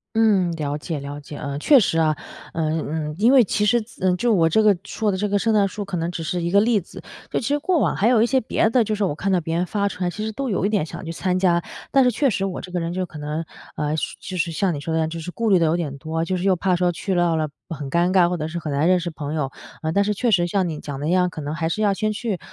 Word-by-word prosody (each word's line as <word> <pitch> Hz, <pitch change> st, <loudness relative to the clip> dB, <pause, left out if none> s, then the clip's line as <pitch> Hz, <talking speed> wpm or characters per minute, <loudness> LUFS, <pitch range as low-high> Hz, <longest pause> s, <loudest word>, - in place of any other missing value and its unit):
嗯， 210 Hz, -6 st, +3 dB
了 150 Hz, -3 st, -3 dB
解 155 Hz, 0 st, -4 dB
了 140 Hz, +1 st, -6 dB
解。 145 Hz, 0 st, -9 dB
呃， 140 Hz, -1 st, -4 dB
确 275 Hz, -, +6 dB
实 175 Hz, -7 st, +1 dB
啊， 155 Hz, -2 st, +2 dB, 0.4 s
嗯 160 Hz, -1 st, 0 dB, 0.3 s
嗯。 -, -, -6 dB
因 225 Hz, +4 st, +4 dB
为 260 Hz, -3 st, +7 dB
其 210 Hz, +1 st, 0 dB
实 235 Hz, +3 st, +4 dB
子 215 Hz, -, -16 dB
呃， 180 Hz, -, +2 dB
就 240 Hz, +5 st, +1 dB
我 165 Hz, -4 st, +4 dB
这 220 Hz, +7 st, +3 dB
个 210 Hz, -2 st, +5 dB
说 210 Hz, 0 st, -1 dB
的 190 Hz, -, -2 dB
这 210 Hz, +2 st, 0 dB
个 205 Hz, 0 st, +2 dB
圣 225 Hz, +3 st, +1 dB
诞 205 Hz, -2 st, +3 dB
树 205 Hz, +2 st, -5 dB
可 185 Hz, -2 st, -4 dB
能 165 Hz, +1 st, -1 dB
只 175 Hz, -2 st, -5 dB
是 175 Hz, +3 st, -2 dB
一 170 Hz, -, -1 dB
个 200 Hz, +2 st, +5 dB
例 225 Hz, -2 st, +3 dB
子， 180 Hz, -, -12 dB, 0.3 s
就 -, -, 0 dB
其 230 Hz, -, -4 dB
实 290 Hz, +1 st, +1 dB
过 350 Hz, +3 st, +1 dB
往 -, -, +1 dB
还 210 Hz, -, +2 dB
有 235 Hz, -3 st, +4 dB
一 -, -, +4 dB
些 260 Hz, +2 st, +2 dB
别 220 Hz, -1 st, +1 dB
的。 245 Hz, +1 st, +4 dB
就 215 Hz, 0 st, -1 dB
是 210 Hz, -1 st, 0 dB
我 180 Hz, -, 0 dB
看 195 Hz, +6 st, -2 dB
到 185 Hz, -2 st, +3 dB
别 165 Hz, 0 st, -3 dB
人 175 Hz, +1 st, 0 dB
发 200 Hz, +1 st, -1 dB
出 190 Hz, -2 st, -4 dB
来 180 Hz, -, +1 dB
其 210 Hz, +4 st, -5 dB
实 220 Hz, -, -3 dB
都 270 Hz, +5 st, -3 dB
有 195 Hz, -4 st, 0 dB
一 -, -, +3 dB
点 200 Hz, -7 st, +1 dB
想 -, -, -8 dB
去 165 Hz, -, -5 dB
参 185 Hz, +1 st, -1 dB
加， 175 Hz, -2 st, +2 dB, 0.3 s
但 275 Hz, -, +5 dB
是 250 Hz, -, +4 dB
确 265 Hz, +3 st, +1 dB
实 195 Hz, -2 st, -1 dB
我 190 Hz, -, -4 dB
这 180 Hz, -, -10 dB
个 180 Hz, -, -1 dB
人 165 Hz, +1 st, -3 dB
就 185 Hz, 0 st, -1 dB
可 165 Hz, -3 st, -10 dB
能， 150 Hz, +2 st, -3 dB, 0.3 s
呃， 150 Hz, 0 st, -1 dB
就 -, -, -2 dB, 0.3 s
就 185 Hz, -, -4 dB
是 170 Hz, -, 0 dB
像 180 Hz, +3 st, 0 dB
你 145 Hz, -, -4 dB
说 160 Hz, +3 st, -4 dB
的 -, -, +2 dB
一 -, -, +2 dB
样， 160 Hz, 0 st, 0 dB
就 165 Hz, 0 st, -5 dB
是 165 Hz, -, -6 dB
顾 225 Hz, +4 st, -1 dB
虑 190 Hz, -, +6 dB
的 165 Hz, -, +3 dB
有 160 Hz, +2 st, +2 dB
点 145 Hz, -5 st, -4 dB
多， 160 Hz, +3 st, -2 dB
就 185 Hz, +2 st, -1 dB
是 -, -, -4 dB
又 190 Hz, -2 st, +3 dB
怕 185 Hz, +1 st, +1 dB
说 180 Hz, 0 st, +2 dB
去 185 Hz, +3 st, -3 dB
到 175 Hz, -2 st, +2 dB
了， 155 Hz, -1 st, 0 dB, 0.2 s
很 145 Hz, -5 st, -6 dB
尴 170 Hz, +3 st, +2 dB
尬， 180 Hz, -2 st, +4 dB
或 180 Hz, -, -1 dB
者 155 Hz, 0 st, -3 dB
是 170 Hz, +2 st, -4 dB
很 155 Hz, -3 st, -4 dB
难 145 Hz, +4 st, +2 dB
认 185 Hz, 0 st, +5 dB
识 170 Hz, 0 st, -3 dB
朋 150 Hz, -1 st, -5 dB
友。 145 Hz, -4 st, -1 dB, 0.3 s
呃， 160 Hz, 0 st, -1 dB
但 200 Hz, -, +3 dB
是 210 Hz, +1 st, 0 dB
确 240 Hz, +4 st, 0 dB
实 175 Hz, -4 st, +3 dB
像 185 Hz, +1 st, 0 dB
你 155 Hz, -2 st, -5 dB
讲 140 Hz, -2 st, -6 dB
的 145 Hz, -, -5 dB
那 170 Hz, -, +1 dB
样， 180 Hz, -1 st, +3 dB
可 160 Hz, -3 st, -7 dB
能 145 Hz, +1 st, -4 dB
还 160 Hz, 0 st, -1 dB
是 215 Hz, +6 st, -2 dB
要 205 Hz, -2 st, +3 dB
先 215 Hz, +2 st, -1 dB
去， 215 Hz, -4 st, -2 dB
180 Hz, 355 characters per minute, -22 LUFS, 160-205 Hz, 0.4 s, 为